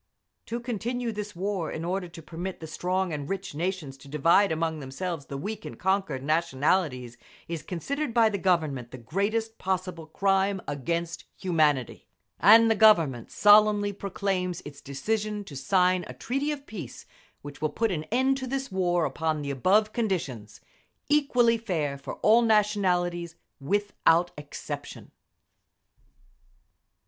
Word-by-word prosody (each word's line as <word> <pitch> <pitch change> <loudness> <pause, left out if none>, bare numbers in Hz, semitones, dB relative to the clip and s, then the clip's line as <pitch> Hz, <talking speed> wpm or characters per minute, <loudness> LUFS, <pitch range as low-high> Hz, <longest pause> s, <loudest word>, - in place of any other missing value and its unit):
To 235 - -3
continue 240 +1 -3
this 210 -2 -6
war 190 -1 -2
in 160 - -4
order 180 +1 -2
to 165 -1 -12
permit 175 +4 -6
the 160 - -7
strong 180 +3 -1
and 145 -1 -5
rich 195 -3 -4
nations 160 -4 -3
to 140 - -15
divide 165 +7 +3
among 160 0 -1
themselves 145 +3 -5
the 140 - -5
weak 210 +8 -5
and - - -8
conquered 190 -8 0
nationalities 145 -4 0 0.3
is 165 -2 -4
considered 275 - -3
by 230 -1 +5
the 200 -2 -3
Government 155 -10 0
the 130 - -9
greatest 210 - -2
possible 185 -3 -3
crime 195 +3 +1
against 165 +4 -3
humanity; 155 - +1 0.3
and 225 +5 +7
the - - +3
Government 165 - +4
solemnly 205 -1 +5
proclaims 190 -2 -2
its 145 -1 -10
decision 210 +9 -2
to 155 -8 -11
sign 180 +6 +2
a 125 - -9
treaty 275 - -2
of 285 -2 -6
peace 210 -8 -8 0.4
which 145 0 -10
will 155 - +1
put 225 +8 0
an 155 -3 -3
end 260 +8 +1
to 260 -1 -5
this 270 -1 -3
war 175 -3 +1
upon 155 -2 -1
the 140 - -3
above 205 - +2
conditions, 160 - -3 0.5
equally 250 -6 +3
fair 160 -10 -2
for 140 - -7
all 230 +2 +6
nationalities 185 -6 +1 0.2
without 175 +1 +2
exception. 150 0 -8
185 Hz, 145 wpm, -27 LUFS, 155-210 Hz, 0.5 s, and